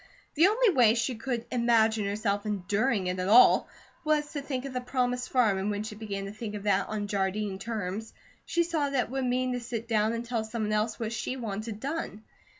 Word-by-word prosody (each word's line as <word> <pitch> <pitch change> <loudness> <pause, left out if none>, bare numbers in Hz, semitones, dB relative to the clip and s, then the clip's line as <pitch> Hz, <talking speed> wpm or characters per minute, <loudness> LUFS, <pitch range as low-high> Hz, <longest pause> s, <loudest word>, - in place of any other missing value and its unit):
The 325 +5 +5
only 445 +1 +3
way 235 -8 +5
she 240 +2 0
could 235 0 -3
imagine 225 -3 +3
herself 205 0 -1
enduring 205 +1 0
it 180 0 -2
at 185 - -1
all 230 +5 +6 0.3
was 305 -1 0
to 290 - -3
think 270 -2 -4
of 275 - -6
the 250 - -2
promised 250 -1 -1
farm, 220 -7 +3
and 195 +2 -1
when 205 0 -2
she 215 0 -6
began 200 -2 -5
to 200 - -6
think 215 0 -6
of 205 - -6
that 200 -2 +2
on 215 -1 -2
Jardine 195 0 -1
terms, 215 -1 -4 0.3
she 340 - +1
saw 320 -4 -1
that 270 -3 +1
it - - -11
would 265 -1 -1
mean 255 0 0
to 245 - -2
sit 235 -1 -5
down 220 -1 +2
and 230 +1 -4
tell 230 -2 -1
someone 220 -1 -3
else 215 +1 0
what 225 -1 -3
she 255 +3 -3
wanted 215 -2 -5
done. 275 -6 -4
225 Hz, 220 wpm, -28 LUFS, 210-250 Hz, 0.3 s, all